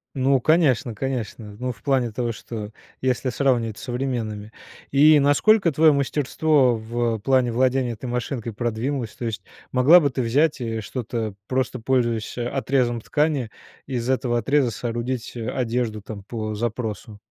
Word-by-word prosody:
Ну, 135 Hz, 0 st, +2 dB
конечно, 140 Hz, -6 st, +3 dB
конечно. 110 Hz, -3 st, -4 dB
Ну, 125 Hz, +2 st, -2 dB
в 120 Hz, -, -13 dB
плане 130 Hz, -4 st, +1 dB
того, 120 Hz, +1 st, -2 dB
что 110 Hz, -1 st, -7 dB, 0.3 s
если 130 Hz, 0 st, 0 dB
сравнивать 120 Hz, -4 st, 0 dB
с -, -, -10 dB
современными. 120 Hz, -5 st, -3 dB, 0.4 s
И 150 Hz, +2 st, +6 dB
насколько 170 Hz, +7 st, +4 dB
твоё 155 Hz, +1 st, +5 dB
мастерство 140 Hz, -1 st, +2 dB
в, 115 Hz, +1 st, -1 dB
э, 110 Hz, -, -6 dB
плане 125 Hz, 0 st, +2 dB
владения 130 Hz, 0 st, +2 dB
этой 115 Hz, +3 st, -8 dB
машинкой 120 Hz, -1 st, -3 dB
продвинулось? 120 Hz, +2 st, -3 dB
То 120 Hz, -, -5 dB
есть 110 Hz, -2 st, -3 dB, 0.3 s
могла 140 Hz, +8 st, +7 dB
бы 145 Hz, -, +2 dB
ты 130 Hz, 0 st, -2 dB
взять 145 Hz, +7 st, +2 dB
и 115 Hz, -2 st, -3 dB
что-то, 115 Hz, -1 st, -4 dB
просто 130 Hz, 0 st, -1 dB
пользуясь, 120 Hz, -2 st, 0 dB
э, 120 Hz, -, -2 dB
отрезом 125 Hz, -2 st, 0 dB
ткани, 145 Hz, -1 st, 0 dB, 0.4 s
из 125 Hz, -2 st, -3 dB
этого 125 Hz, -2 st, +1 dB
отреза 135 Hz, +1 st, +2 dB
соорудить, 120 Hz, +2 st, -3 dB
э, 115 Hz, -2 st, -3 dB
одежду 120 Hz, -4 st, -2 dB
там 100 Hz, 0 st, -8 dB
по 110 Hz, 0 st, -4 dB
запросу? 110 Hz, -2 st, -4 dB
125 Hz, 155 wpm, -23 LUFS, 115-135 Hz, 0.4 s, могла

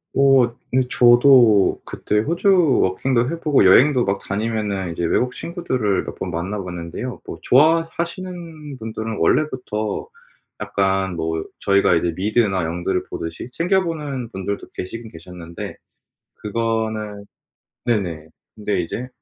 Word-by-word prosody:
어 135 Hz, -3 st, +4 dB, 0.2 s
네. 130 Hz, -, +4 dB
저도 120 Hz, -4 st, +5 dB
그때 105 Hz, -, -1 dB
호주 170 Hz, -, +3 dB
워킹도 120 Hz, +6 st, +1 dB
해 170 Hz, -, -4 dB
보고 150 Hz, -7 st, +3 dB
여행도 125 Hz, +6 st, +5 dB
막 100 Hz, 0 st, 0 dB
다니면은 100 Hz, -4 st, -2 dB
외국 125 Hz, +9 st, 0 dB
친구들을 130 Hz, -, -2 dB
몇 -, -, -7 dB
번 -, -, -4 dB
만나봤는데요. 90 Hz, +5 st, -5 dB
뭐 -, -, -7 dB
좋아하시는 165 Hz, +1 st, 0 dB
분들은 110 Hz, -1 st, -5 dB
원래부터 125 Hz, -, -1 dB, 0.5 s
약간 95 Hz, -1 st, 0 dB
뭐 80 Hz, -1 st, -2 dB, 0.2 s
저희가 100 Hz, -2 st, +3 dB
이제 85 Hz, +1 st, +1 dB
미드나 100 Hz, -2 st, +1 dB
영드를 90 Hz, +3 st, -2 dB
보듯이 80 Hz, +9 st, -6 dB
챙겨보는 165 Hz, -, -1 dB
분들도 100 Hz, 0 st, -5 dB
계시긴 110 Hz, +5 st, -6 dB
계셨는데 85 Hz, 0 st, -9 dB, 0.6 s
그거는 110 Hz, -1 st, -3 dB, 0.6 s
네네 90 Hz, -9 st, -1 dB, 0.3 s
근데 105 Hz, -3 st, -1 dB
이제 115 Hz, +9 st, -5 dB
110 Hz, 280 characters per minute, -21 LUFS, 95-135 Hz, 0.6 s, 저도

